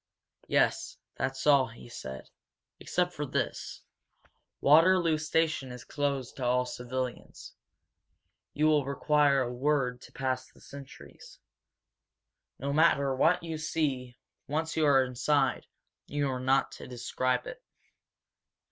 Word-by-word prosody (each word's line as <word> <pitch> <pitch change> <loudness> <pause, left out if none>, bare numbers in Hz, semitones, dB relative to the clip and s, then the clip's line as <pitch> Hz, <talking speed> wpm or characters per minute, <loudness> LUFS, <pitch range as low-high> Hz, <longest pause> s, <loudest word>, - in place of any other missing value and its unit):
"Yes, - - +1 0.2
that's 135 0 -3
all," 140 -3 +5
he 115 +1 -13
said. 65 - -8 0.5
"Except 180 0 -1
for 150 - -4
this. 140 - -3 0.8
Waterloo 165 +2 +5
station 155 -4 0
is 125 0 -9
closed 140 -1 -3
to 130 - -5
all 125 +1 +2
civilians. 125 0 -6 1.0
You 150 - +2
will 155 -2 +4
require 140 0 +2
a 125 -1 -2
word 125 -2 0
to - - -14
pass 130 -1 -3
the - - -21
sentries. 140 -1 -13 1.2
No 140 +2 -3
matter 140 -3 +3
what 165 +6 +3
you 160 -2 -4
see, 140 -6 -2 0.3
once 160 +3 -2
you 155 -2 +3
are 135 -2 +5
inside, 130 +2 0 0.4
you 145 0 -1
are 130 - -3
not 130 +1 +2
to - - -10
describe 125 +1 -1
it. - - -8
140 Hz, 125 wpm, -29 LUFS, 125-155 Hz, 1.2 s, all